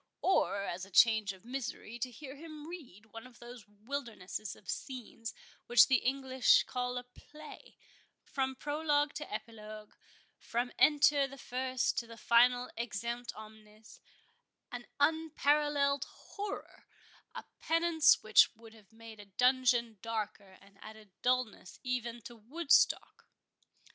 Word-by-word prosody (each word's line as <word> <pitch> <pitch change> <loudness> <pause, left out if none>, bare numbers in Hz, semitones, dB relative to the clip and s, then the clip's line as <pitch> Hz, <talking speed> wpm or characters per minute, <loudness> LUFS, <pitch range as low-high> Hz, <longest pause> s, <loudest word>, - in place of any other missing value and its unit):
or, 200 - +2
as 185 -1 -4
a 195 - -9
change 215 0 +5
of 190 +2 -15
misery, 240 -2 -6
to 255 - -2
hear 265 +3 -10
him 310 0 -10
read 270 - -10
one 225 +3 -9
of 250 - -18
those 240 -2 -11
wildernesses 215 -2 -6
of 195 - -20
scenes 230 -2 -6 0.4
which 240 -1 +8
the 265 - +5
English 265 - +3
call 250 - -3
a 245 - -4
play, 300 +5 -14 0.5
from 265 -1 -2
prologue 295 +1 0
to 300 0 -7
epilogue—from 215 +2 -7
Enter 290 -2 +5
the 275 +1 -11
first 255 -1 -1
to 235 - -8
the 230 0 -11
final 245 +2 +4
Exeunt 235 +1 -4
omnes—an 215 +2 -14
unparalleled 295 -2 +2
horror—a 410 0 -10 0.2
penance 330 -1 +4
which 215 0 +6
would 225 0 -15
have 215 -3 -19
made 225 -1 -12
a 205 - -10
dungeon 240 +1 +2
darker, 215 -3 -4
and 195 0 -21
added 215 -2 -12
dullness 250 -6 -1
even 240 -2 -3
to 240 - -10
Woodstock!" 275 +8 +1
245 Hz, 125 wpm, -33 LUFS, 220-280 Hz, 0.5 s, which